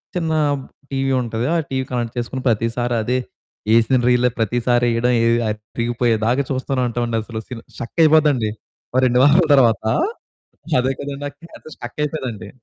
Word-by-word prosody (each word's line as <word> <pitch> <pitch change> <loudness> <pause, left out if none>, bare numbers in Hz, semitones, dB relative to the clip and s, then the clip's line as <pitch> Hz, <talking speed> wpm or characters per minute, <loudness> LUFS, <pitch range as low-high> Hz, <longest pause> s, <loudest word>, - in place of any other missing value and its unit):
చిన్న 165 -2 -1 0.3
బ్ 130 - -10 0.3
టీవీ 135 0 0
ఉంటది. 115 0 -3
ఆ - - +2
టీవీ 130 -1 -2
కనెక్ట్ 120 -1 -3
చేసుకొన్న 130 +2 -3
ప్రతిసారి 115 +2 0
అదే, 125 +3 0 0.5
యేసీన 115 +3 +4
రీలే 125 0 +3
ప్రతిసారి 120 +2 +1
యేయడం, 120 +2 +1 0.4
అరిగిపోయేదాకా 115 +3 -1
చూస్తూనే 130 0 -1
ఉంటాం 120 +1 -2
అండి 115 -1 -1
అసలు. 110 -1 -6
Sin 120 -2 -8
stuck 120 +5 -8
అయిపోద్దండి. 150 -8 +4 0.4
ఓ - - +1
2 125 0 +3
వారాల 155 +5 +6
తరువాత 120 -6 +4 1.0
అదే 130 +1 0
కదండీ 140 0 -5
ఆ - - -14
క్యాసెట్టు 165 -1 -13
స్టక్ 120 +4 -9
అయిపోదండి. 125 -9 -4
125 Hz, 150 wpm, -20 LUFS, 115-135 Hz, 1.0 s, వారాల